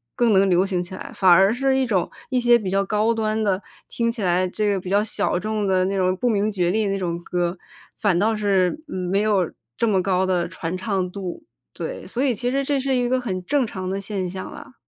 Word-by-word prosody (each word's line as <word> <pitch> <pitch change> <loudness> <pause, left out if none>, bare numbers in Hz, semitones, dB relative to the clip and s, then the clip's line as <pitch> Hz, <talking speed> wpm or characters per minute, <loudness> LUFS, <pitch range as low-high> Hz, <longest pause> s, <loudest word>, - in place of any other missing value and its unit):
更 235 -2 +3
能 195 0 +4
流 180 +1 +3
行 185 -3 -1
起 180 +2 -7
来。 - - -8
反 190 - +3
而 190 +4 +6
是 265 +2 +1
一 265 - +2
种 200 -7 0 0.2
一 255 - +2
些 240 -1 +5
比 200 -5 -4
较 195 0 +2
高 215 +3 +1
端 220 -1 -1
的， 195 -2 +1 0.3
听 230 -1 -1
起 230 -3 -4
来 180 0 +2
这 210 +3 -1
个 195 - -1
比 180 - -7
较 200 +2 +3
小 215 - 0
众 215 +1 -2
的 185 -1 +2
那 195 +1 -1
种 185 -1 +1
不 250 - -1
明 215 -2 +1
觉 180 -3 0
厉 215 +1 +1
那 195 0 0
种 170 -2 -3
歌， 175 0 -1 0.4
反 200 -5 +1
倒 220 +4 +2
是， 200 +2 +1
嗯， 185 -10 -4
没 200 +1 +2
有 205 -5 +1 0.3
这 230 - +1
么 195 -4 +2
高 185 0 +1
的 180 -2 0
传 170 +2 -4
唱 190 -2 -1
度。 190 - -6 0.3
对， - - -6
所 245 - -3
以 260 -4 +2
其 245 +4 -2
实 275 +1 0
这 280 0 0
是 270 0 0
一 245 -1 +1
个 255 +1 +2
很 190 -7 -4
正 280 +4 +2
常 185 -4 -5
的 195 +1 -2
现 195 -2 -3
象 190 +1 -6
了。 - - -11
195 Hz, 265 characters per minute, -22 LUFS, 185-225 Hz, 0.4 s, 而